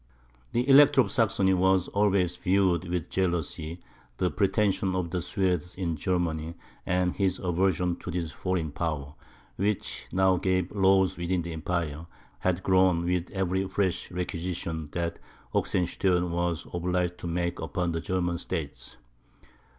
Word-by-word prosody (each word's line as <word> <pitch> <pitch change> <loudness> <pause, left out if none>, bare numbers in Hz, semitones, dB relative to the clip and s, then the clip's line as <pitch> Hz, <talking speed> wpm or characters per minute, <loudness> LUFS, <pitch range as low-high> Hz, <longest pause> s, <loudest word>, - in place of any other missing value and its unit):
The 120 +2 +1
Elector 140 0 +7
of - - -1
Saxony 105 -6 +2
had 95 0 +3
always 100 -4 +2
viewed 90 -2 +1
with 90 -3 -3
jealousy 85 -2 -1 0.4
the - - +1
pretensions 100 -2 +1
of 90 -3 -2
the 90 - -1
Swedes 90 -2 -1
in 85 -3 -2
Germany; 85 -1 -1 0.3
and 90 -1 +1
his 95 -2 0
aversion 90 -1 +1
to - - -8
this 85 -2 -3
foreign 90 -5 -2
power, 75 -2 -3 0.4
which 100 +1 -2
now 95 0 +3
gave 95 0 0
laws 95 -1 +3
within 85 0 -1
the 85 0 -5
Empire, 80 -1 -3 0.3
had 90 0 0
grown 95 -2 +3
with 90 0 0
every 95 0 -1
fresh 95 -2 -1
requisition 85 -3 -4
that 85 -1 -2 0.3
Oxenstiern 90 0 +1
was 85 -1 -1
obliged 90 0 -1
to - - -5
make 85 +1 -1
upon 85 +3 -2
the 80 0 -2
German 90 -1 -1
states. 80 -6 -5
90 Hz, 140 wpm, -28 LUFS, 85-95 Hz, 0.4 s, Elector